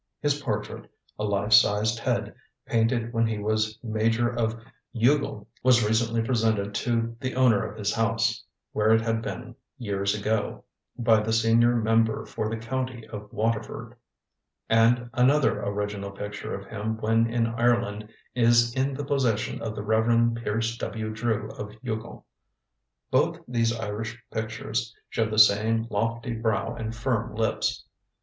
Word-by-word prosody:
His 145 0 0
portrait, 110 -6 -4 0.3
a - - -2
life 100 +1 0
sized 105 +2 +4
head, - - -1 0.3
painted 115 +1 0
when 115 -1 +2
he 110 -1 -2
was 110 +1 -1
Major 115 +1 +1
of 115 -1 -1 0.4
Youghal, 120 -3 +1 0.2
was 120 -4 +4
recently 115 +1 +1
presented 110 -4 0
to 115 +1 -1
the 130 0 -3
owner 125 -6 +4
of - - -6
his 100 -1 -1
house, 115 0 0 0.3
where 110 +1 +2
it 115 - +2
had 115 0 -1
been 120 +1 -6 0.2
years 100 -4 -1
ago, 105 0 -1 0.3
by 115 -2 +4
the 110 +1 -2
senior 115 +2 +4
member 115 -1 +2
for 110 - -3
the 115 - -3
county 125 0 -4
of 105 -1 -8
Waterford; 110 0 -2 0.7
and 115 +2 +3
another 130 -3 +3
original 100 0 -3
picture 105 +1 -6
of 100 - -8
him 110 +1 -4
when 115 +1 +2
in 115 -1 +1
Ireland 115 -2 0 0.2
is 120 -1 +4
in 135 +1 0
the 145 +1 -4
possession 130 -6 0
of 110 -1 -4
the 105 - -5
Rev. 115 +2 +3
Pierce 115 0 -2
W. 110 -2 -4
Drew 110 -1 -1
of 105 0 -8
Youghal. 115 -2 -5 0.9
Both - - +2
these 115 -2 +1
Irish 110 0 -4
pictures 110 +1 -3 0.2
show 110 -1 0
the 110 - -3
same 110 +2 +5
lofty 115 +4 -1
brow 115 0 -1
and 115 -1 -5
firm 115 -2 -1
lips. 110 0 -1
115 Hz, 150 wpm, -26 LUFS, 110-120 Hz, 0.9 s, same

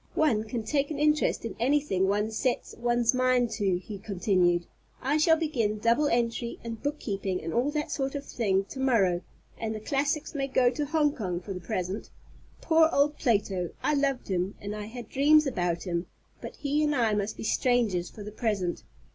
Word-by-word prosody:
"One 230 -9 +2
can 230 0 -4
take 280 +5 0
an 305 - -4
interest 300 -4 +2
in 230 - -5
anything 245 -7 +2
one 210 +2 0
sets 245 +3 -1
one's 240 0 +2
mind 255 -2 +2
to," 200 -5 +1
he 200 +2 -8
continued. 180 -3 +1 0.3
"I 285 +3 +1
shall 320 +1 +5
begin 240 -10 0
double 230 +7 +2
entry 235 -1 0
and 230 -1 -6
bookkeeping 200 -10 -2
and 165 - -5
all 245 +4 +2
that 300 0 -2
sort 270 0 -2
of 280 0 -4
thing 195 -5 0
to 265 - -7
morrow, 200 -10 +2 0.4
and 220 -1 -2
the - - -4
classics 285 +6 -1
may 275 -2 -1
go 255 -2 +3
to 290 +3 -3
Hong 300 -1 +2
Kong 180 -6 -3
for 195 +2 -6
the 180 - -5
present. 185 -1 -3 0.5
Poor 320 -1 +4
old 290 +1 +2
Plato! 200 - +1
I - - +2
loved 275 -3 0
him, 185 +1 -1
and 205 +1 -5
I 210 -1 -5
had 235 0 -8
dreams 300 +5 +4
about 175 -10 -1
him; 175 -1 -2 0.3
but - - -7
he 295 +1 0
and 300 -1 +1
I 230 -4 +2
must 205 +1 -1
be - - -6
strangers 220 -7 +1
for 210 - -10
the 210 - -7
present. 205 -6 -1
230 Hz, 195 wpm, -28 LUFS, 200-280 Hz, 0.5 s, shall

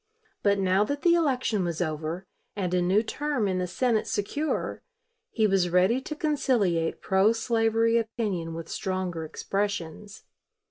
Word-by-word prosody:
But 200 -1 +3
now 190 +1 +3
that 285 +4 -4
the 345 - +5
election 255 - +1
was 170 -2 -2
over 160 +2 -3 0.3
and 185 -3 -2
a 180 - +2
new 190 +5 +3
term 285 -2 -1
in 185 -1 0
the 180 - -1
Senate 230 +3 0
secure, 290 +10 -2 0.5
he 220 - +1
was 190 -3 +2
ready 185 +8 +3
to 305 - -6
conciliate 240 - 0
pro 195 +3 +3
slavery 225 0 +2
opinion 205 -8 -3
with 165 0 -6
stronger 185 -4 -3
expressions. 200 +3 -4
200 Hz, 145 wpm, -27 LUFS, 180-230 Hz, 0.5 s, the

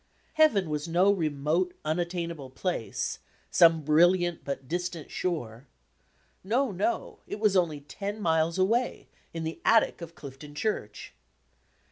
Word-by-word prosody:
Heaven 225 - +4
was 150 +1 -3
no 180 +4 +4
remote, 160 0 0
unattainable 170 -3 -2
place 130 - -3 0.3
"some 165 -3 +5
bril 155 +4 +6
liant 175 -2 -2
but 135 -2 -5
distant 175 -1 -4
shore." 135 -8 -3 0.8
No, 240 +6 +1
no! 200 - -2
It - - -5
was 210 -2 +3
only 165 -5 +1
ten 200 +8 -6
miles 165 -2 +1
away, 225 +7 0 0.2
in 165 -1 -5
the 160 +1 -5
attic 225 -5 +3
of 170 0 -8
Clifton 145 +1 -10
Church! 105 - -3
170 Hz, 130 wpm, -28 LUFS, 150-190 Hz, 0.8 s, bril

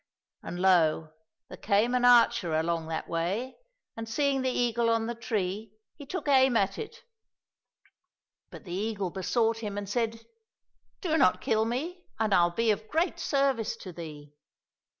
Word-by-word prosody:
And 175 - -6
lo! 165 -4 +3 0.4
there - - -10
came 215 +4 +2
an 250 -1 +2
archer 230 -9 +5
along 165 0 -1
that 160 0 -4
way, 190 +10 -2 0.4
and 225 0 -6
seeing 280 +2 +1
the 260 - 0
eagle 235 -2 +1
on 230 -1 +1
the 235 - -3
tree, 215 -3 -3 0.2
he 285 -3 -11
took 370 -1 -5
aim 265 -3 +5
at 195 -2 0
it; 460 +2 -8 1.5
but - - -11
the 175 -5 -8
eagle 200 -1 -2
besought 225 +5 0
him 205 -3 -5
and 205 -1 -4
said, 230 +1 -2 0.4
" - - -47
Do 320 -4 +1
not 185 - +4
kill 220 -1 +1
me, 320 +10 -4 0.2
and 220 -2 +1
I'll 175 -1 +5
be 225 +5 +1
of 215 +1 -3
great 335 +2 0
service 275 -7 0
to 185 - -9
thee 150 -3 -9
225 Hz, 165 wpm, -28 LUFS, 185-250 Hz, 1.5 s, archer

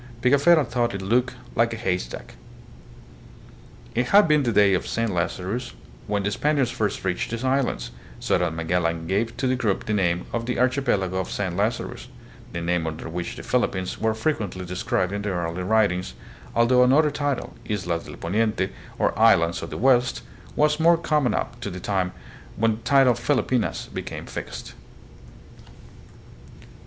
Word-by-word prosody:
Pigafetta 140 +4 +5
thought 120 -3 -1
it 95 - -4
looked 125 +5 +1
" - - -18
like 115 0 +2
a - - -5
haystack." 90 - -3 1.6
It 120 +1 0
had 205 -1 +6
been 150 -1 +4
the 120 -4 0
day 100 -2 +5
of 90 - 0
Saint 115 -1 -1
Lazarus 95 +7 -2 0.3
when 105 -1 0
the 100 - 0
Spaniards 140 +2 +1
first 105 -5 -2
reached 90 -1 -1
these 115 +1 -4
islands, 130 - 0 0.3
so - - +1
that 85 -2 -1
Magellan 85 0 -1
gave 105 +6 -1
to 130 - -1
the 130 0 +2
group 110 -6 -1
the 110 - -1
name 90 -3 +1
of 115 0 -2
the 125 - -1
Archipelago 125 -8 +1
of 95 - -2
Saint 95 -4 -2
Lazarus, 105 +5 -2 0.4
the 85 - -4
name 85 -1 0
under 80 +1 -5
which 85 +1 -4
the - - -8
Philippines 95 -7 -1
were 110 0 +1
frequently 110 - -2
described 90 +1 -1
in 100 - -2
the 105 - -2
early 85 -1 -2
writings, 95 -2 +1 0.4
although 120 +2 +4
another 145 +4 +5
title, 145 -2 -2 0.2
Islas 90 -5 -2
del - - -9
Poniente 105 +2 0 0.3
or - - +1
Islands 85 0 +4
of 85 - -6
the - - -6
West, 125 0 +2 0.3
was 150 +1 +2
more 165 +1 +5
common 150 -7 +1
up - - -3
to - - -3
the 90 -1 -6
time 95 -1 -1 0.4
when 115 0 +1
the - - -15
title 135 -3 +5
Filipinas 125 0 0
became - - -5
fixed. - - -7
110 Hz, 170 wpm, -24 LUFS, 90-125 Hz, 1.6 s, had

